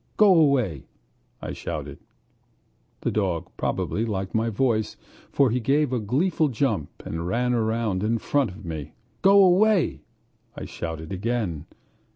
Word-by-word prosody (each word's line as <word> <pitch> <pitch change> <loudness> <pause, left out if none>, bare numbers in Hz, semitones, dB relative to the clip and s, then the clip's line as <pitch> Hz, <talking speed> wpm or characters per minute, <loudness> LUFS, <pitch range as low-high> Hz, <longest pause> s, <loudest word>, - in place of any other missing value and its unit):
"Go 210 -3 +7
away!" 135 - +2 0.6
I - - -4
shouted. - - -6 1.0
The - - -1
dog 95 -6 -1
probably 110 - -1
liked 95 -4 -3
my 115 +1 +1
voice, 110 -1 0 0.3
for 135 -4 +3
he 125 - +1
gave 140 +3 +1
a 125 - +1
gleeful 155 - +1
jump 110 - -1 0.2
and 85 +1 -4
ran 125 +6 0
about 110 -4 0
in 110 +2 +1
front 135 +2 0
of 95 +2 -11
me. 80 -4 -6 0.3
"Go 200 +1 +7
away!" 185 - +3 0.5
I - - -6
shouted 80 0 -6
again. 95 -6 -2
115 Hz, 140 wpm, -25 LUFS, 95-140 Hz, 1.0 s, Go